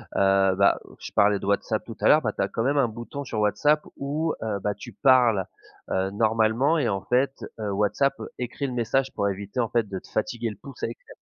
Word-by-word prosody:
heu, 95 -1 +4
bah 100 +1 +4 0.2
je - - -8
parlais 100 0 +4
de - - -7
Whatsapp 100 0 0
tout - - -9
à - - +3
l'heure, - - +6
bah - - -1
tu - - -3
as - - 0
quand 115 - -2
même 140 +4 +1
un 135 -3 +4
bouton 120 +5 -7
sur 115 -5 -4
Whatsapp 145 +9 +3 0.2
où 150 +4 -1
heu, 105 -3 -2
bah 105 - 0
tu - - -10
parles 120 -8 +4 0.5
heu, 95 +1 0
normalement 110 +7 +2
et 140 -6 +1
en 95 -2 -1
fait, 130 +2 +1 0.3
heu, 105 -2 -2
Whatsapp 105 +8 +1 0.2
écrit 125 +3 -3
le 130 - -5
message 130 +3 0
pour 100 - +1
éviter 100 +4 -5
en 115 -2 +1
fait 115 -4 0
de 95 - -4
te - - -18
fatiguer 115 +2 -2
le 105 - -11
pouce 135 -3 -11
à - - +2
écrire. 115 - -11
115 Hz, 235 wpm, -25 LUFS, 100-135 Hz, 0.5 s, l'heure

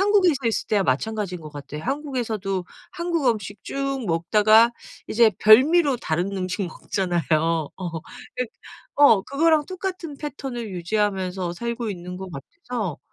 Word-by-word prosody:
한국에서 370 - +3
있을 225 - -1
때와 205 -2 +3
마찬가지인 185 +5 -1
것 155 - -9
같아요. 145 +1 -8
한국에서도 230 -10 -2 0.3
한국 340 -5 -1
음식 205 -3 -3
쭉 275 -2 -2
먹다가 215 +7 +5 0.4
이제 230 0 +5
별미로 275 +6 +6
다른 180 0 -2
음식 185 +2 -2
먹잖아요. 175 0 -2
어 165 +2 0 0.5
그 250 -1 -1 0.5
어 255 -9 +6
그거랑 305 +4 +2
똑같은 370 -5 -5
패턴을 270 -6 -5
유지하면서 185 -1 -1
살고 235 +3 -3
있는 180 -2 -6
것 190 - -7
같아서 205 - -5
215 Hz, 310 characters per minute, -24 LUFS, 180-275 Hz, 0.5 s, 별미로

